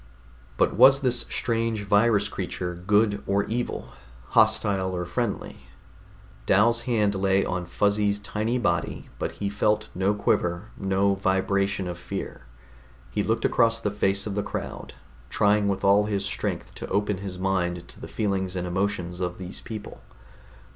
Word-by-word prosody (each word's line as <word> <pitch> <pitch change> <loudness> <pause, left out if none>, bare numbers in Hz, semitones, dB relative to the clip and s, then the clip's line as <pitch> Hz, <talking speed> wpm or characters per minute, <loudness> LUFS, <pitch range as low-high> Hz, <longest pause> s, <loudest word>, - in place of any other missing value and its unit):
But - - +3
was 135 +5 +7
this 125 -3 0
strange 115 -3 -1
virus 105 0 +3
creature 90 -2 -4
good 100 +4 +2
or 100 +1 +2
evil, 120 +4 -3 0.4
hostile 95 -2 +2
or 90 0 -2
friendly? 100 +4 -3 0.9
Dal's 115 +4 +4
hand 105 -4 +2
lay 95 0 +2
on 90 -1 -3
Fuzzy's 105 +2 +1
tiny 105 +4 -2
body, 85 -9 -1
but - - -2
he 100 - -3
felt 105 +1 0
no 95 +3 +1
quiver, 90 0 0
no 95 0 +1
vibration 100 0 0
of 90 0 -5
fear. - - -6 0.6
He 105 - 0
looked 115 +2 0
across 115 -1 +3
the 105 -2 -1
face 100 -1 +1
of 105 - -3
the 105 - 0
crowd, - - -6 0.3
trying 105 0 +3
with 100 -1 -1
all 100 +1 +5
his 100 -2 -1
strength 100 - -3
to - - -4
open 105 0 0
his 95 -2 -6
mind 90 -2 -1
to - - -10
the - - -7
feelings 95 -3 -1
and 90 -1 -2
emotions 90 -1 -2
of 90 -1 -3
these 90 0 -6
people. 110 -2 -8
100 Hz, 155 wpm, -26 LUFS, 95-105 Hz, 0.9 s, was